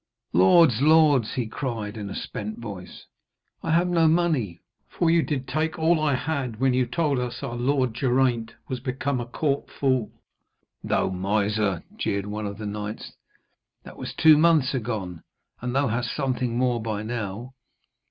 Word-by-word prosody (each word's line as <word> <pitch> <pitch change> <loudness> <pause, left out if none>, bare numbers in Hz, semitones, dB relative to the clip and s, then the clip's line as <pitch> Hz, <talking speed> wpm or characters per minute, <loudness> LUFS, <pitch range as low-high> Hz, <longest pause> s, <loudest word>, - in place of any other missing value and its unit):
'Lords! 110 - +5
lords,' 150 -6 +4
he 125 - -1
cried 110 -3 -4
in 105 -2 -5
a - - -6
spent 105 +1 -5
voice, 100 -6 -9 0.6
'I - - -4
have 170 +2 +3
no 170 -2 +3
money, 155 - +1 0.3
for 165 -1 +1
you 170 0 +4
did 135 -4 -3
take 155 +5 -1
all 160 +1 +3
I 150 -3 +2
had 130 -6 -3
when 130 -1 +3
you 125 -1 +1
told 145 0 0
us 120 -1 -4
our 120 - -4
lord 130 0 +1
Geraint 120 -2 +1
was 130 - -3
become 130 0 -2
a 120 - -6
court 140 +3 -1
fool.' 130 -5 0 0.7
'Thou - - +1
miser!' 100 0 0
jeered 100 0 -1
one 105 0 -4
of 100 0 -6
the 110 - -6
knights, 105 +1 -5 0.7
'that - - -12
was - - -6
two 155 -2 +6
months 155 -5 +4
agone, 105 -9 -3 0.4
and 125 +1 -3
thou 140 +1 +2
hast 115 +1 -2
something 130 -4 -1
more 125 -2 +1
by 110 -2 -3
now. 115 +2 -5
125 Hz, 165 wpm, -25 LUFS, 110-145 Hz, 0.7 s, two